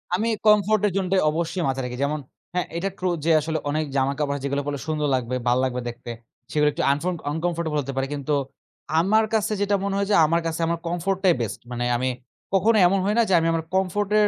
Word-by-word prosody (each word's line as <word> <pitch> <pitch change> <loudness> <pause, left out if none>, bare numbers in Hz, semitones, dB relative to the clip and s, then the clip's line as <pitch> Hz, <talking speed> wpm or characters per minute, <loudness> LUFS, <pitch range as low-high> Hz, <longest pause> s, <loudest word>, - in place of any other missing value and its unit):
আমি 220 +5 0 0.2
কমফোর্ট 210 0 +4
এর - - -1
জোনটাই 190 0 +1
অবশ্যই 170 +2 -2
মাথায় 135 0 -1
রাখি। 125 0 -5
যেমন 150 +2 0 0.3
হ্যাঁ, 180 0 0
এটা 195 +3 -1
ট্রু 185 - -1 0.2
যে 165 - +4
আসলে 160 +1 -2
অনেক 155 +2 0
জামা 135 0 +2
কাপড় 145 -1 0
যেগুলা 140 +1 -1
পড়লে 145 -1 -3
সুন্দর 150 -1 0
লাগবে, 125 0 -2
ভালো 120 +1 +3
লাগবে 125 -1 -1
দেখতে। 120 0 -9 0.4
সেগুলা 150 -1 +3
একটু - - -2
আংফং 155 +6 -1 0.2
আনকম্ফোর্টেবল 165 -1 -1
হতে 135 +1 -5
পারে। 135 0 -1
কিন্তু 145 +1 -2 0.7
আমার 215 +6 +3
কাছে 215 -1 +1
যেটা 205 0 +2
মনে 200 0 -1
হয় 200 0 0
যে - - +5
আমার 165 +2 +1
কাছে 165 0 -3
আমার 170 0 -1
কমফোর্ট 175 +3 -1
টাই 185 -2 +6
বেস্ট। 115 - -3
মানে 120 0 -2
আমি 130 +2 0 0.4
কখনো 215 +4 +4
এমন 195 +2 +2
হয় 205 +2 +1
না? - - +6
যে - - +2
আমি 165 - 0
আমার 165 0 -1
কমফোর্ট 190 +2 0
এর 210 - +5
165 Hz, 225 wpm, -24 LUFS, 140-195 Hz, 0.7 s, টাই